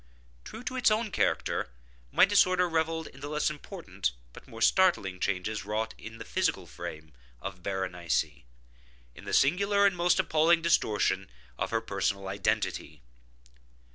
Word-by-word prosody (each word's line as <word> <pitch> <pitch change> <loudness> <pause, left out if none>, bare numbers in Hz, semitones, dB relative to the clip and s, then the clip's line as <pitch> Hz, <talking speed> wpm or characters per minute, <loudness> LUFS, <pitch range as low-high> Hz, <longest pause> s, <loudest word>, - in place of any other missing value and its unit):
True 230 - -9
to 255 - -4
its 255 - +4
own 215 0 0
character, - - 0 0.4
my - - +6
disorder 185 -3 +4
revelled 160 -1 -1
in 135 - -12
the 140 - -6
less 150 0 0
important 145 - -4 0.2
but - - -13
more 115 - -10
startling 115 - +3
changes 100 +3 -2
wrought 110 +2 -2
in 115 0 -10
the - - -8
physical - - 0
frame 80 -1 -8 0.3
of 95 +3 -7
Berenice—in 85 -7 -2 0.8
the 100 - -5
singular 200 - +3
and 195 -2 +3
most 175 0 +2
appalling 165 +2 +3
distortion 105 - +1 0.3
of - - -1
her 115 0 0
personal 100 -2 -2
identity. 95 -9 -2
115 Hz, 140 wpm, -29 LUFS, -, 0.8 s, my